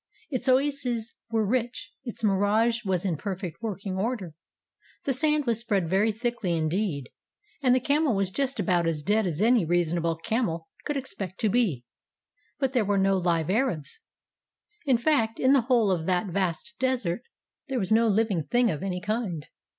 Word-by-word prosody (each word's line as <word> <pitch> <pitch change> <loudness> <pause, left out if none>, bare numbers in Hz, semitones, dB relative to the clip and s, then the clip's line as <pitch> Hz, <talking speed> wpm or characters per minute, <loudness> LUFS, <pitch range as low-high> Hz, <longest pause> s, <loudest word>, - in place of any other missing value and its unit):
Its 260 0 -1
oases 255 -4 +1 0.2
were 225 -1 +1
rich; 240 +3 -2
its 235 -3 -7
mirage 215 +4 +2
was 190 -2 -1
in 175 -5 0
perfect 190 -1 -5
working 200 -3 -4
order; 200 -5 -2 0.7
the 275 - 0
sand 300 +2 +2
was 235 -2 +1
spread 205 -7 0
very 195 +6 +2
thickly 220 -6 -1
indeed; 160 - -1 0.5
and 255 -2 +4
the - - +3
camel 285 -1 +2
was 195 -1 0
just 275 +4 -1
about 175 -3 +2
as 155 -3 -1
dead 210 +3 +2
as 175 +3 -1
any 235 -2 +4
reasonable 170 0 +1
camel 170 -3 -2 0.2
could 295 -1 -1
expect 200 -8 -5
to 215 - +2
be; 190 - +1 0.7
but 270 -3 0
there 245 -4 +3
were 205 0 +1
no 195 0 +3
live 170 -2 +1
Arabs. 215 - -1 0.9
In 260 -3 +5
fact, 230 -4 +1
in 260 +1 +4
the 275 - +5
whole 235 -4 +3
of 165 -3 -1
that 180 +1 +2
vast 190 +4 -1
desert 245 -8 0 0.5
there 270 -2 -2
was 190 -4 -2
no 225 +1 +5
living 210 -5 +1
thing 240 +5 +2
of 155 - -4
any 185 -2 -3
kind. 210 -8 -2
215 Hz, 175 wpm, -27 LUFS, 180-245 Hz, 0.9 s, In